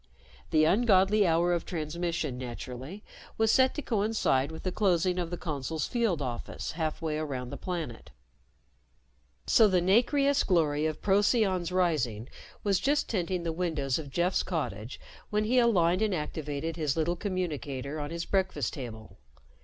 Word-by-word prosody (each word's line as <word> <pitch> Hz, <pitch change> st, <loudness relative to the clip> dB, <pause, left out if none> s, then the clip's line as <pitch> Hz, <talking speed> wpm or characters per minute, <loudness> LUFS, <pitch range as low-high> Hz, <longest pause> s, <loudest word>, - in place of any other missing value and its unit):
The 155 Hz, -1 st, +4 dB
ungodly 195 Hz, +2 st, +4 dB
hour 170 Hz, +2 st, +3 dB
of 170 Hz, -, -1 dB
transmission, 160 Hz, -4 st, -3 dB
naturally, 130 Hz, -, -7 dB, 0.3 s
was 220 Hz, 0 st, +3 dB
set 260 Hz, +1 st, +4 dB
to 295 Hz, -, -4 dB
coincide 205 Hz, -, +1 dB
with 160 Hz, -, -9 dB
the 185 Hz, -, -1 dB
closing 180 Hz, -2 st, +1 dB
of 175 Hz, -2 st, -2 dB
the 175 Hz, -, -4 dB
Consul's 155 Hz, -1 st, -3 dB
field 225 Hz, -, 0 dB
office 120 Hz, -3 st, -5 dB
halfway 155 Hz, -1 st, -2 dB
around 130 Hz, -5 st, -4 dB
the -, -, -5 dB
planet. 165 Hz, -11 st, -5 dB, 1.4 s
So 220 Hz, -, +6 dB
the 185 Hz, -3 st, +3 dB
nacreous 275 Hz, +10 st, +3 dB
glory 155 Hz, -4 st, +2 dB
of 155 Hz, -1 st, -5 dB
Procyon's 195 Hz, -3 st, +2 dB
rising 140 Hz, -, 0 dB, 0.3 s
was 195 Hz, -2 st, +2 dB
just 285 Hz, +6 st, +1 dB
tinting 180 Hz, -3 st, -1 dB
the 165 Hz, -1 st, -2 dB
windows 160 Hz, -6 st, -1 dB
of 150 Hz, -3 st, -7 dB
Jeff's 175 Hz, +6 st, +1 dB
cottage 125 Hz, -, -4 dB, 0.3 s
when 210 Hz, 0 st, +1 dB
he 245 Hz, +4 st, +3 dB
aligned 185 Hz, -6 st, +3 dB
and 215 Hz, -3 st, +1 dB
activated 150 Hz, 0 st, -4 dB
his 150 Hz, -2 st, -1 dB
little 165 Hz, +2 st, +1 dB
communicator 155 Hz, -, -3 dB
on 145 Hz, 0 st, -4 dB
his 170 Hz, +1 st, -4 dB
breakfast 185 Hz, -, 0 dB
table. 110 Hz, -, -8 dB
170 Hz, 150 wpm, -29 LUFS, 150-195 Hz, 1.4 s, So